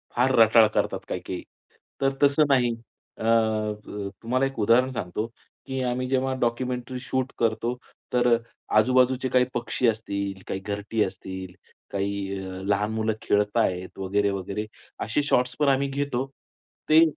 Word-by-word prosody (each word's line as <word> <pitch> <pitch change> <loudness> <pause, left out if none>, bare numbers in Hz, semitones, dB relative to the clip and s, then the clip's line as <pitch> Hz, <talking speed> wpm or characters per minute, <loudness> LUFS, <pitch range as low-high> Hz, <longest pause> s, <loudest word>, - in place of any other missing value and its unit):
फार 125 +2 +3
रटाळ 110 0 +7
करतात 105 - -1
काही-काही. - - -4 0.6
तर 135 - +4
तसं 140 +2 +5
नाही. 125 -3 +4 0.5
अ, - - -7
त 110 -3 0
तुम्हाला 130 +3 +1
एक 135 -4 -4
उदाहरण 115 +5 +4
सांगतो 105 -1 -3 0.4
की 135 -1 -3
आम्ही 125 +1 -1
जेव्हा 130 0 +1
डॉक्युमेंटरी 125 +1 -1
शूट 130 +1 -2
करतो, 115 +1 +1 0.4
तर 120 -1 +4
अ, - - 0 0.4
आजूबाजूचे 130 +3 +3
काही 125 0 +4
पक्षी 120 +1 0
असतील, 100 -3 -2
काही 95 - -2
घरटी 105 +2 -1
असतील, 95 -1 -6 0.4
काही 100 -1 -2
अ, 95 0 -6
लहान 105 +1 +1
मुलं 110 0 0
खेळत 105 +2 +1
आहेत 90 -4 0
वगैरे-वगैरे 100 +1 -1 0.4
असे 110 +7 +1
शॉट्स 125 -3 +1
पण 145 -2 +4
आम्ही 135 +1 +2
घेतो. 135 -2 -1 0.6
ते 155 +1 +8
115 Hz, 145 wpm, -26 LUFS, 100-130 Hz, 0.6 s, ते